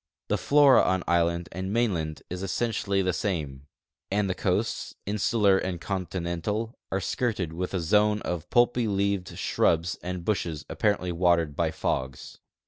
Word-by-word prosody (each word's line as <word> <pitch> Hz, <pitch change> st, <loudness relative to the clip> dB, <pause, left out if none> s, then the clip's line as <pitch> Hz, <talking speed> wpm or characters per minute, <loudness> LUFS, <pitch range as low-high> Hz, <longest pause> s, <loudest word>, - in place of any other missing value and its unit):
The -, -, +2 dB
flora 140 Hz, -3 st, +6 dB
on 95 Hz, -1 st, +1 dB
island 85 Hz, 0 st, +1 dB
and 95 Hz, +1 st, -4 dB
mainland 90 Hz, -10 st, -1 dB
is 90 Hz, +1 st, -5 dB
essentially 100 Hz, -1 st, 0 dB
the 95 Hz, -1 st, +1 dB
same; 75 Hz, -9 st, -3 dB, 0.4 s
and 100 Hz, +1 st, +1 dB
the 95 Hz, -, 0 dB
coasts, -, -, -1 dB
insular 105 Hz, -1 st, +2 dB
and 90 Hz, -2 st, -3 dB
continental, 95 Hz, +4 st, -3 dB, 0.2 s
are 95 Hz, -, 0 dB
skirted 100 Hz, -5 st, -2 dB
with 90 Hz, +3 st, -3 dB
a -, -, +1 dB
zone 105 Hz, +5 st, +3 dB
of 90 Hz, -1 st, -4 dB
i)ulpy 120 Hz, -1 st, +3 dB
leaved 100 Hz, -2 st, -1 dB
shrubs 85 Hz, 0 st, +1 dB
and 90 Hz, -1 st, -5 dB
bushes 85 Hz, -7 st, -2 dB
apparently 100 Hz, -4 st, 0 dB
watered 85 Hz, -3 st, +2 dB
by -, -, +1 dB
fogs. 65 Hz, 0 st, -3 dB
95 Hz, 145 wpm, -27 LUFS, 85-105 Hz, 0.4 s, flora